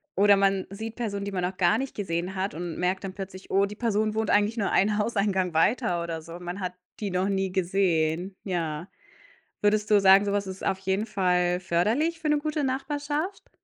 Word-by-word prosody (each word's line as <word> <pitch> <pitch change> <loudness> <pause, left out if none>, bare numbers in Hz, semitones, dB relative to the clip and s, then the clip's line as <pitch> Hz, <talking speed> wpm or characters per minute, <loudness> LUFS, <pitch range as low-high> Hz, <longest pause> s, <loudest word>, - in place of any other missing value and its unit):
Oder 200 0 +6
man 195 -1 +2
sieht 220 +3 -6
Personen, 200 -4 -3
die 200 - -4
man 180 -2 -2
noch 185 +1 -2
gar 175 -2 +3
nicht 270 0 -4
gesehen 180 -2 -2
hat 190 +2 -2
und 170 0 -5
merkt 185 +2 0
dann 190 -1 -5
plötzlich, 190 -1 -8
oh, 195 +1 +4
die 205 +1 -7
Person 215 -1 0
wohnt 220 -1 0
eigentlich 210 +3 +2
nur 205 -3 0
einen 210 +2 +3
Hauseingang 200 -5 0
weiter 175 +1 +2
oder 165 -1 -4
so, 165 +2 -9
man 180 +2 -6
hat 180 -1 -3 0.3
die 205 -2 -3
noch 185 +2 0
nie 195 -1 0
gesehen, 180 -1 0
ja. 165 -3 -3 0.7
Würdest 210 +1 +2
du 205 - +7
sagen, 195 +1 +7
so 200 - 0
was 200 -1 -1
ist 190 0 -6
auf 190 - 0
jeden 195 +2 -1
Fall 180 -4 +1
förderlich 225 - +1
für 315 -1 -2
'ne 300 - +4
gute 305 0 -2
Nachbarschaft? 290 +6 -3
195 Hz, 205 wpm, -26 LUFS, 180-215 Hz, 0.7 s, du